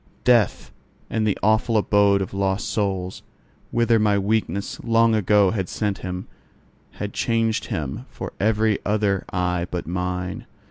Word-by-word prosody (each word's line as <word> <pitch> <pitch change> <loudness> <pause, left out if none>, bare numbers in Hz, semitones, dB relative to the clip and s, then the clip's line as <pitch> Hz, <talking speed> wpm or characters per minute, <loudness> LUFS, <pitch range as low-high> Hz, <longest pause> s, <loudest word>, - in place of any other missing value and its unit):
Death 120 -5 +2 0.4
and 110 -1 0
the 105 - +1
awful 110 +2 +3
abode 100 -1 +3
of 95 - -8
lost 95 +1 -1
souls, 95 -4 -2 0.5
whither 115 -1 +3
my 105 -1 +3
weakness 100 -1 -1
long 115 0 +3
ago 105 -2 +4
had 95 -5 -2
sent 105 -3 -2
him, 90 0 -5 0.7
had 105 -1 -5
changed 115 -2 0
him 80 - -4
for - - -7
every 110 0 +2
other 105 -2 +1
eye 90 -1 -1
but 90 - -4
mine. 90 +1 -3
100 Hz, 140 wpm, -23 LUFS, 95-110 Hz, 0.7 s, ago